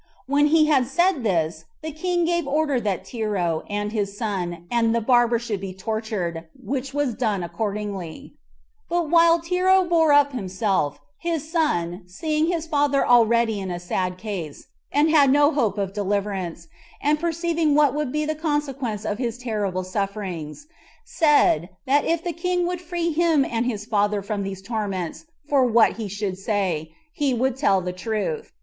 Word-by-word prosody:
When 285 Hz, +3 st, +3 dB
he 310 Hz, 0 st, +5 dB
had 275 Hz, -5 st, +3 dB
said 345 Hz, +2 st, +2 dB
this, 165 Hz, -5 st, 0 dB, 0.2 s
the 315 Hz, -, -4 dB
king 345 Hz, +3 st, 0 dB
gave 345 Hz, -3 st, 0 dB
order 285 Hz, -3 st, +1 dB
that 200 Hz, -5 st, -2 dB
Tero, 200 Hz, -9 st, -1 dB
and 205 Hz, 0 st, -2 dB
his 205 Hz, -2 st, -2 dB
son, 180 Hz, -6 st, -3 dB
and 230 Hz, -1 st, +2 dB
the -, -, +3 dB
barber 240 Hz, 0 st, +3 dB
should 225 Hz, -4 st, -4 dB
be 190 Hz, -1 st, -6 dB
tortured, 190 Hz, -5 st, -3 dB
which 270 Hz, 0 st, -4 dB
was 285 Hz, -3 st, 0 dB
done 215 Hz, -5 st, -1 dB
accordingly; 205 Hz, -, -5 dB, 0.6 s
but 340 Hz, -3 st, -1 dB
while 335 Hz, 0 st, +6 dB
Tero 365 Hz, +3 st, +3 dB
bore 325 Hz, -3 st, +4 dB
up 285 Hz, 0 st, +5 dB
himself, 190 Hz, -, -1 dB, 0.2 s
his 325 Hz, -2 st, -3 dB
son 180 Hz, -, 0 dB
seeing 305 Hz, -, -1 dB
his 335 Hz, -2 st, -1 dB
father 290 Hz, -3 st, +2 dB
already 235 Hz, -2 st, +4 dB
in 190 Hz, -1 st, -4 dB
a 175 Hz, -1 st, -4 dB
sad 180 Hz, +1 st, -2 dB
case, 185 Hz, -8 st, -6 dB, 0.2 s
and 300 Hz, +2 st, +3 dB
had 290 Hz, -4 st, +5 dB
no 290 Hz, +2 st, +5 dB
hope 230 Hz, -, 0 dB
of 195 Hz, -1 st, -2 dB
deliverance, 195 Hz, -4 st, -2 dB, 0.3 s
and 300 Hz, +1 st, +1 dB
perceiving 335 Hz, -2 st, 0 dB
what 295 Hz, -3 st, +4 dB
would 300 Hz, -3 st, -2 dB
be 300 Hz, +1 st, -1 dB
the 310 Hz, -, -1 dB
consequence 280 Hz, -8 st, -2 dB
of 210 Hz, 0 st, -2 dB
his 240 Hz, -2 st, -2 dB
terrible 210 Hz, -6 st, -2 dB
sufferings, 195 Hz, -, -4 dB, 0.4 s
said, 290 Hz, -, +3 dB, 0.2 s
that 280 Hz, +2 st, +3 dB
if 335 Hz, 0 st, 0 dB
the 345 Hz, -, -2 dB
king 355 Hz, +2 st, 0 dB
would 360 Hz, 0 st, -3 dB
free 345 Hz, -1 st, -2 dB
him 320 Hz, -3 st, +3 dB
and 230 Hz, +1 st, -1 dB
his 210 Hz, -4 st, -3 dB
father 205 Hz, -2 st, +1 dB
from 205 Hz, 0 st, -3 dB
these 195 Hz, -1 st, -5 dB
torments 200 Hz, -, -4 dB, 0.2 s
for 280 Hz, -3 st, +3 dB
what 230 Hz, -3 st, +4 dB
he 220 Hz, -2 st, -4 dB
should 200 Hz, -1 st, -4 dB
say, 190 Hz, -7 st, -1 dB, 0.2 s
he 285 Hz, -7 st, 0 dB
would 255 Hz, +1 st, 0 dB
tell 200 Hz, -9 st, +2 dB
the 180 Hz, 0 st, -4 dB
truth. 195 Hz, -4 st, -3 dB
235 Hz, 170 wpm, -23 LUFS, 195-300 Hz, 0.6 s, while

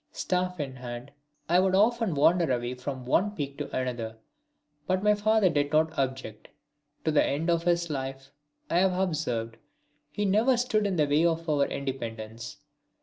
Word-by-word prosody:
Staff 180 Hz, -1 st, -2 dB
in 135 Hz, -3 st, -4 dB
hand 120 Hz, +1 st, -7 dB, 0.4 s
I 175 Hz, +2 st, +4 dB
would 190 Hz, 0 st, +3 dB
often 220 Hz, -3 st, +2 dB
wander 165 Hz, +1 st, +3 dB
away 120 Hz, 0 st, -1 dB
from 130 Hz, 0 st, -6 dB
one 205 Hz, +11 st, +1 dB
peak 140 Hz, -4 st, -5 dB
to 145 Hz, -, -4 dB
another, 120 Hz, -3 st, -3 dB, 0.7 s
but 185 Hz, +1 st, 0 dB
my 210 Hz, 0 st, +5 dB
father 215 Hz, 0 st, +3 dB
did 145 Hz, -4 st, +1 dB
not 160 Hz, +1 st, +2 dB
object. 130 Hz, -5 st, -3 dB, 0.6 s
To 160 Hz, -, +2 dB
the 150 Hz, -, +4 dB
end 160 Hz, +5 st, 0 dB
of 170 Hz, 0 st, 0 dB
his 170 Hz, -1 st, +2 dB
life, 135 Hz, -2 st, -5 dB, 0.4 s
I 170 Hz, -, 0 dB
have 185 Hz, -1 st, +2 dB
observed, 125 Hz, -11 st, -2 dB, 0.5 s
he 205 Hz, +7 st, -2 dB
never 220 Hz, +6 st, +3 dB
stood 220 Hz, -4 st, +1 dB
in 195 Hz, -, -1 dB
the 155 Hz, -3 st, +3 dB
way 145 Hz, +3 st, +2 dB
of 165 Hz, 0 st, 0 dB
our 145 Hz, -2 st, +2 dB
independence. 115 Hz, -5 st, -5 dB
155 Hz, 170 wpm, -28 LUFS, 130-185 Hz, 0.7 s, my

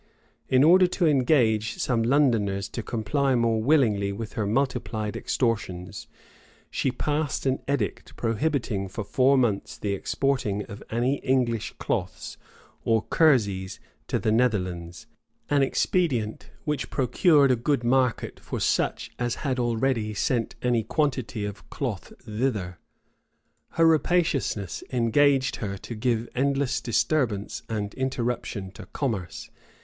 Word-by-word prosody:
In 130 Hz, +1 st, +5 dB
order 180 Hz, +4 st, +7 dB
to 180 Hz, 0 st, 0 dB
engage 125 Hz, -7 st, +2 dB
some 120 Hz, -3 st, 0 dB
Londoners 115 Hz, -7 st, +2 dB
to 115 Hz, -, -4 dB
comply 125 Hz, +5 st, 0 dB
more 115 Hz, -2 st, +2 dB
willingly 110 Hz, -7 st, +3 dB
with 110 Hz, +2 st, -6 dB
her 110 Hz, -5 st, -1 dB
multiplied 110 Hz, -3 st, -1 dB
extortions, 95 Hz, -7 st, -2 dB, 0.6 s
she -, -, 0 dB
passed 145 Hz, +3 st, -2 dB
an 130 Hz, 0 st, +1 dB
edict 125 Hz, -9 st, -2 dB
prohibiting 115 Hz, -4 st, -1 dB
for 95 Hz, +3 st, -5 dB
four 130 Hz, +6 st, +3 dB
months 115 Hz, -6 st, 0 dB
the 100 Hz, -1 st, -2 dB
exporting 105 Hz, -1 st, -1 dB
of 100 Hz, -, -10 dB
any 125 Hz, +5 st, +1 dB
English 125 Hz, -5 st, 0 dB
cloths -, -, -3 dB, 0.5 s
or 115 Hz, -1 st, +2 dB
kerseys 100 Hz, -, +2 dB, 0.3 s
to -, -, 0 dB
the 110 Hz, -, 0 dB
Netherlands; 90 Hz, -8 st, 0 dB, 0.5 s
an 145 Hz, -1 st, +4 dB
expedient 135 Hz, -5 st, 0 dB, 0.2 s
which 150 Hz, -3 st, -2 dB
procured 140 Hz, +2 st, +4 dB
a -, -, +4 dB
good 120 Hz, +2 st, 0 dB
market 125 Hz, 0 st, +1 dB
for -, -, -5 dB
such -, -, 0 dB
as 120 Hz, -1 st, -1 dB
had 130 Hz, -2 st, 0 dB
already 115 Hz, -2 st, 0 dB
sent 115 Hz, +2 st, 0 dB
any 120 Hz, -2 st, +2 dB
quantity 130 Hz, -5 st, -1 dB
of 100 Hz, -1 st, -8 dB
cloth -, -, -4 dB
thither. 105 Hz, -6 st, -2 dB, 1.0 s
Her 165 Hz, -, +5 dB
rapaciousness 155 Hz, -, +1 dB
engaged 130 Hz, +3 st, +3 dB
her 100 Hz, -3 st, -4 dB
to 120 Hz, -, -8 dB
give 115 Hz, 0 st, -1 dB
endless 140 Hz, 0 st, 0 dB
disturbance 115 Hz, -4 st, 0 dB
and 105 Hz, -2 st, -3 dB
interruption 120 Hz, -6 st, -3 dB
to 95 Hz, -, -11 dB
commerce. 105 Hz, -, -4 dB
120 Hz, 125 wpm, -26 LUFS, 105-135 Hz, 1.0 s, order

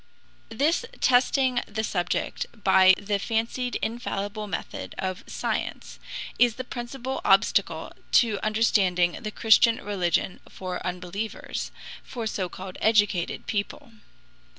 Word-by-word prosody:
This 290 Hz, -, +1 dB, 0.2 s
testing 255 Hz, 0 st, +3 dB
the 220 Hz, 0 st, -3 dB
subject 175 Hz, -5 st, -1 dB, 0.2 s
by 190 Hz, -1 st, +7 dB
the 200 Hz, -1 st, -1 dB
fancied 230 Hz, +3 st, -1 dB
infallible 215 Hz, -2 st, -3 dB
method 170 Hz, -5 st, -5 dB
of 185 Hz, -1 st, -3 dB
science -, -, -3 dB, 0.4 s
is 240 Hz, -2 st, +5 dB
the 255 Hz, -, -4 dB
principal 255 Hz, +1 st, -5 dB
obstacle -, -, +2 dB, 0.2 s
to 220 Hz, -4 st, +4 dB
understanding 195 Hz, -5 st, +2 dB
the 215 Hz, -, -3 dB
Christian 225 Hz, +1 st, +5 dB
religion 180 Hz, -3 st, 0 dB
for 185 Hz, -1 st, -5 dB
unbelievers, 180 Hz, +4 st, -4 dB, 0.3 s
for 235 Hz, -3 st, -6 dB
so 195 Hz, -4 st, -2 dB
called 185 Hz, +1 st, -8 dB
educated 205 Hz, -5 st, +2 dB
people. 205 Hz, +2 st, -3 dB
215 Hz, 110 wpm, -26 LUFS, 190-235 Hz, 0.4 s, by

